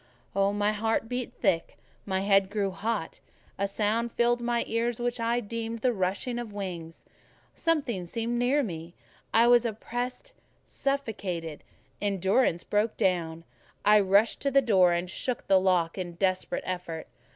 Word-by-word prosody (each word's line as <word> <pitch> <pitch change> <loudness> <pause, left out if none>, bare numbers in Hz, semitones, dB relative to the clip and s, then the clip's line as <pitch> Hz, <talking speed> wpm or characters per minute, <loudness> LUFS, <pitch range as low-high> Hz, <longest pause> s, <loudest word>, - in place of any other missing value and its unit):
My 205 +1 +2
heart 225 +1 0
beat 250 0 -3
thick, 185 -7 0 0.3
my 190 -1 0
head 195 -1 +3
grew 200 -1 -1
hot; 205 -2 -3 0.4
a 200 - +1
sound 220 +4 0
filled 240 +1 +2
my 240 0 0
ears, 230 +1 -1
which 240 0 -1
I 230 +1 +1
deemed 230 +1 -5
the 250 -1 +2
rushing 200 +5 -1
of 235 -3 -6
wings; 175 -5 -6 0.5
something 275 - -1
seemed 230 +5 -2
near 270 +4 +2
me; 170 -5 -6 0.4
I 230 +1 +5
was 240 0 +6
oppressed, 245 - -4 0.3
suffocated: 200 - -3 0.4
endurance 195 -1 +1
broke 210 +2 0
down; 170 -5 0 0.4
I 210 0 +7
rushed 200 +3 +3
to 280 - +1
the 275 0 +5
door 195 -8 +4
and 175 +1 0
shook 240 +6 -3
the 195 -1 +5
lock 180 -2 +1
in 175 -2 -4
desperate 185 +1 -1
effort. 175 -3 -4
210 Hz, 150 wpm, -28 LUFS, 185-235 Hz, 0.5 s, I